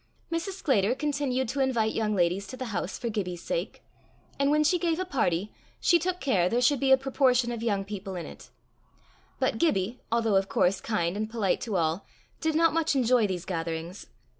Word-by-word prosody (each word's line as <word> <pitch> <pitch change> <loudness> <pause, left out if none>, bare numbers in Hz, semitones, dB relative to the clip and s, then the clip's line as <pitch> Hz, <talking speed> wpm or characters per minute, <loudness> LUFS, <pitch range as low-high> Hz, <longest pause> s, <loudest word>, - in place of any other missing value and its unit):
Mrs. 335 +4 -2
Sclater 255 - +1
continued 275 -3 -1
to 275 - -3
invite 240 -5 +1
young 215 -2 0
ladies 180 +2 +1
to 255 - -8
the 260 - -4
house 180 +1 -3
for 240 - -4
Gibbie's 185 -6 -3
sake, - - -4 0.6
and 280 0 +3
when 300 +1 +3
she 345 +4 +2
gave 335 -2 0
a 370 - -1
party, 210 - -1 0.3
she 345 - +4
took 360 +2 -2
care 195 -10 +2
there 235 - +1
should 255 +2 +3
be 270 -1 +2
a 265 - +8
proportion 260 -2 +2
of 235 -2 -4
young 200 -4 0
people 195 -1 -6
in 175 - -5
it; - - -12 0.9
but - - 0
Gibbie, 230 - 0
although, 225 -3 +2
of 195 +1 0
course, 185 +1 +2
kind 175 -5 -1
and 215 +1 -2
polite 220 -5 0
to 220 -4 -3
all, 165 +2 0 0.4
did 320 -1 0
not 330 0 +4
much 325 -2 +1
enjoy 245 -3 +3
these 180 -3 -4
gatherings. 165 +1 -4
230 Hz, 200 wpm, -27 LUFS, 195-280 Hz, 0.9 s, a